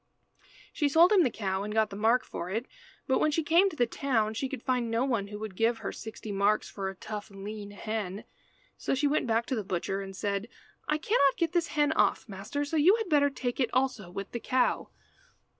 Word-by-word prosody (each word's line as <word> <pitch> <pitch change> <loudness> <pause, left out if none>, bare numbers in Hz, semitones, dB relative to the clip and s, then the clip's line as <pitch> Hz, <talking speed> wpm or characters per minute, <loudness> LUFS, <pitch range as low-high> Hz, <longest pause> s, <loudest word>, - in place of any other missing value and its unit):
She 295 - +1
sold 335 +6 +6
him 405 -3 +6
the 300 - +3
cow 190 -4 -2
and 210 +1 -4
got 220 -1 +2
the - - -6
mark 225 +4 +2
for 175 - -6
it, 225 +6 -2 0.4
but 265 - +2
when 310 - +3
she 315 +2 0
came 340 +6 +4
to 360 - -10
the 245 - +3
town 225 -4 0
she 260 +4 -2
could 260 -3 -6
find 250 -2 0
no 230 +3 +1
one 230 -7 0
who 210 +1 -7
would 210 -2 -6
give 225 +3 +2
her - - -4
sixty 220 -1 -8
marks 200 +2 +2
for 195 -1 -4
a 195 - -8
tough 210 +2 -7
lean 205 +1 -7
hen. 205 -1 -4 0.6
So - - 0
she 290 +3 0
went 290 -2 +1
back 230 +1 +1
to 260 - -2
the 215 - -2
butcher 195 +1 -2
and 195 -1 -8
said 200 +2 -2 0.4
"I 300 - +2
cannot 305 - +2
get 335 -2 +1
this 345 -2 +1
hen 295 0 +4
off, 315 - +2
master, 210 +8 -4
so 315 +2 -2
you 345 +8 +6
had 445 -4 -3
better 285 -2 +4
take 255 -3 -4
it 250 -4 +2
also 255 -7 0
with 195 +2 -6
the 235 - -3
cow." 255 +1 +1
230 Hz, 230 wpm, -29 LUFS, 205-285 Hz, 0.6 s, sold